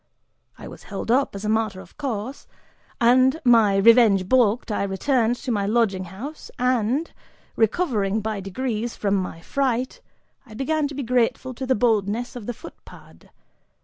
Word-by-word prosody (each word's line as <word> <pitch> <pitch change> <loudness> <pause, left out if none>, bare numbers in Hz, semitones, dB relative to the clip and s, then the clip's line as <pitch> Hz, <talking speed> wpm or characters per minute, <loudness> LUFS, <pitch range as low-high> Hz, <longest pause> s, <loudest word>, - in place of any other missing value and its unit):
I - - -10
was - - -11
held - - -3
up, 265 -3 +2
as 200 +1 -6
a - - -1
matter 215 -3 0
of - - -14
course, 260 -2 -5 0.5
and, 255 +5 +4
my 225 -5 +5
revenge 200 -2 +5
balked, 235 -1 +2
I 205 - -1
returned 225 +5 +1
to 245 - -5
my 200 -3 0
lodging 205 -4 +1
house 235 - -9
and, 250 +4 0 0.4
recovering 220 - +1
by 215 -1 -3
degrees 225 +4 -3
from 200 -2 -1
my 185 -4 -2
fright, 260 - -2 0.4
I 220 -4 -14
began 295 +4 0
to 285 - -9
be 280 - -3
grateful 250 +1 0
to 260 +2 -6
the 260 - +3
boldness 225 +2 0
of 235 -4 -8
the 245 - -2
footpad. 335 - -15
230 Hz, 160 wpm, -23 LUFS, 205-260 Hz, 0.5 s, my